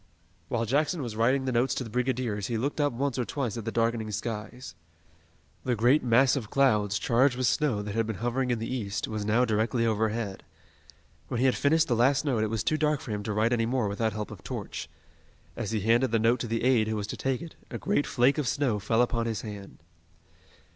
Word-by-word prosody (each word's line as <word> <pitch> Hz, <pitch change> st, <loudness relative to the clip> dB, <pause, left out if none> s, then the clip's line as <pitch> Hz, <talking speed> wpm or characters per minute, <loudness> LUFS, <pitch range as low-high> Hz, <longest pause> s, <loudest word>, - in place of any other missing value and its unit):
While 115 Hz, +3 st, -1 dB
Jackson 145 Hz, -, 0 dB
was 115 Hz, -3 st, -5 dB
writing 130 Hz, +4 st, +2 dB
the 130 Hz, -, 0 dB
notes 125 Hz, +1 st, +1 dB
to -, -, -2 dB
the 115 Hz, -, -8 dB
brigadiers 125 Hz, -5 st, -1 dB
he 115 Hz, -, -1 dB
looked 140 Hz, +6 st, -1 dB
up 145 Hz, -, +2 dB
once 130 Hz, +1 st, -2 dB
or -, -, +1 dB
twice 120 Hz, -3 st, -3 dB
at 115 Hz, -2 st, -6 dB
the 115 Hz, -, -2 dB
darkening 115 Hz, -1 st, 0 dB
skies. 110 Hz, +1 st, -5 dB, 0.9 s
The 125 Hz, -2 st, 0 dB
great 120 Hz, +7 st, +3 dB
mass 125 Hz, +3 st, +4 dB
of 115 Hz, -7 st, -4 dB
clouds, 105 Hz, -7 st, +2 dB
charged 125 Hz, +2 st, +2 dB
with 130 Hz, -, 0 dB
snow 125 Hz, -7 st, +1 dB
that 105 Hz, -1 st, -5 dB
had 115 Hz, 0 st, 0 dB
been 110 Hz, -, -3 dB
hovering 120 Hz, +5 st, -1 dB
in 120 Hz, -, +1 dB
the 110 Hz, -, -4 dB
east, 105 Hz, -5 st, -3 dB
was 110 Hz, -1 st, -4 dB
now 115 Hz, +4 st, +3 dB
directly 115 Hz, +1 st, +1 dB
overhead. 110 Hz, -2 st, -1 dB, 0.9 s
When 120 Hz, -, -3 dB
he 130 Hz, -, +2 dB
had 130 Hz, -, +4 dB
finished 155 Hz, +2 st, +3 dB
the 120 Hz, -, +1 dB
last 135 Hz, +5 st, +3 dB
note 125 Hz, -7 st, +1 dB
it 110 Hz, -, 0 dB
was 110 Hz, -1 st, -1 dB
too 155 Hz, -, +1 dB
dark 150 Hz, -1 st, +1 dB
for 115 Hz, -, -8 dB
him 105 Hz, -1 st, -2 dB
to 105 Hz, -, -4 dB
write 110 Hz, +3 st, +2 dB
any 115 Hz, -1 st, +1 dB
more 125 Hz, -3 st, 0 dB
without 110 Hz, +2 st, -1 dB
help 105 Hz, 0 st, -5 dB
of 95 Hz, -8 st, -10 dB
torch. -, -, -6 dB, 0.7 s
As 105 Hz, -, -4 dB
he 110 Hz, -2 st, -1 dB
handed 115 Hz, +5 st, +3 dB
the 115 Hz, -, +2 dB
note 115 Hz, +3 st, +2 dB
to 120 Hz, -, -3 dB
the 115 Hz, +1 st, -2 dB
aide 120 Hz, -4 st, +3 dB
who 110 Hz, -, -1 dB
was 105 Hz, -1 st, -2 dB
to 105 Hz, -, -5 dB
take 135 Hz, -1 st, -1 dB
it, 165 Hz, -, -9 dB, 0.2 s
a -, -, -5 dB
great 195 Hz, -8 st, 0 dB
flake 130 Hz, +4 st, +2 dB
of 145 Hz, -, -1 dB
snow 130 Hz, -6 st, 0 dB
fell 115 Hz, +4 st, +2 dB
upon 115 Hz, -1 st, -1 dB
his 110 Hz, -3 st, -2 dB
hand. 100 Hz, -6 st, -9 dB
115 Hz, 235 wpm, -28 LUFS, 110-130 Hz, 0.9 s, mass